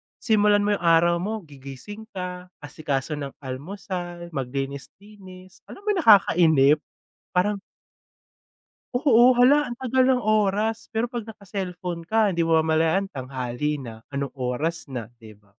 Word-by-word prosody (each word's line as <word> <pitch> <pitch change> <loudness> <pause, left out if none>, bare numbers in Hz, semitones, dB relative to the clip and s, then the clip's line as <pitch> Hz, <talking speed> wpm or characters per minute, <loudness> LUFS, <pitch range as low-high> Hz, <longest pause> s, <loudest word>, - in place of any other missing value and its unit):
simulan 210 -2 +3
mo 205 - +1
yung - - -11
araw 170 +1 +4
mo, 210 +2 -4
gigising 145 +10 -10
ka, 180 0 -6 0.2
asikaso 145 0 -3
ng 140 -2 -6
almusal, 175 +4 -6
maglinis-linis, 185 - -7
alam 400 - -12
mo 425 - +1
yung 390 - 0
nakakainip. 160 - +5 0.6
Parang 200 +2 +1 1.4
Oo, 245 -2 +5
hala 275 +1 +5
ang 240 - -7
tagal 260 0 +1
ng 255 -1 +3
oras. 215 0 0
Pero 225 +1 0
‘pag 240 -1 -5
naka-cellphone 185 -5 -6
ka, 210 +1 +1
‘di 170 - +1
mamamalayan 160 +3 +2
tanghali 130 0 -4
na, 115 -4 -9
anong 140 0 -4
oras 135 +5 -3
na, 120 -5 -5
‘di 110 -2 -14
ba. 105 - -31
180 Hz, 135 wpm, -24 LUFS, 140-210 Hz, 1.4 s, nakakainip